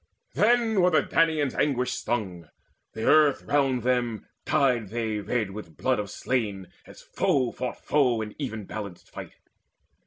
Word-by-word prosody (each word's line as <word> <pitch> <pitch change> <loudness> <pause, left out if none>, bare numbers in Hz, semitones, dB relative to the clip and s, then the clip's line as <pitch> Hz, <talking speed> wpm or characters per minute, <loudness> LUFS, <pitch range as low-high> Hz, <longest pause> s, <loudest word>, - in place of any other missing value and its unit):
Then 225 -2 +3
were 180 - +5
the 160 - +3
Danaans 160 -4 +1
anguish 125 -3 0
stung: 95 -9 -3 0.4
the 110 0 -4
earth 150 -3 +4
All - - -6
round 135 -4 +2
them 120 -3 0 0.2
dyed 125 -8 +1
they 110 -1 -2
red 110 -1 -2
with 95 -5 -10
blood 130 -3 +1
of 105 -1 -4
slain, 105 -7 -2 0.2
As - - -14
foe 130 -3 0
fought 125 -1 -6
foe 130 -6 +2
in 105 -1 -8
even 110 -7 -4
balanced 100 -4 -8
fight. - - -9
125 Hz, 155 wpm, -26 LUFS, 110-145 Hz, 0.4 s, were